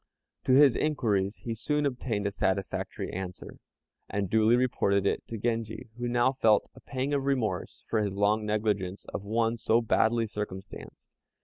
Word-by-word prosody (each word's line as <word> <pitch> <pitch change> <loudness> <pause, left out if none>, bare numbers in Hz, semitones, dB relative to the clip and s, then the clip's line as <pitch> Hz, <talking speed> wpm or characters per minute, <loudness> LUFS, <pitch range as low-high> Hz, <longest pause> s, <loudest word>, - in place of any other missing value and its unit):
To 130 - +3
his 140 -1 +7
inquiries 105 -10 0
he 115 - -3
soon 150 +6 -1
obtained 120 -6 -2
a 100 - 0
satisfactory 95 0 -2
answer, 90 -1 -6 0.5
and 100 -2 -2
duly 110 +1 +5
reported 100 -6 +1
it - - +1
to 115 - -5
Genji, 115 0 -3
who 120 - -1
now 120 +1 +3
felt 110 -6 +3
a - - -14
pang 135 +1 -3
of 140 -1 0
remorse 130 -6 -1
for 110 - +1
his 100 -2 -2
long 105 +2 +2
negligence 105 -3 -1
of - - -3
one 115 +2 0
so 115 0 +3
badly 115 0 +2
circumstanced. 105 -3 -7
110 Hz, 165 wpm, -29 LUFS, 100-120 Hz, 0.5 s, his